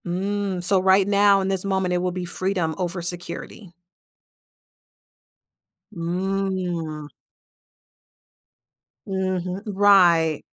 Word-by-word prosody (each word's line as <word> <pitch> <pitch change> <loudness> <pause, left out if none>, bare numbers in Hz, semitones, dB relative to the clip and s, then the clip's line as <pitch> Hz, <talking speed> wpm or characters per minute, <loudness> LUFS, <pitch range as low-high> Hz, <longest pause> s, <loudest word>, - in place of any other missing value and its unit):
Mm, 190 +1 -2
so 190 +1 +2
right 190 +1 +4
now 200 -1 +4
in 190 - -2
this 190 -1 -1
moment, 190 -2 -1
it 180 - +1
will 180 0 -1
be 180 0 -5
freedom 180 -2 -1
over 180 -1 -3
security. 175 +2 -6 2.2
Mm. 175 -3 -3 2.0
Mhm 185 0 -3
Right. 185 -6 +4
185 Hz, 90 wpm, -23 LUFS, 175-195 Hz, 2.2 s, right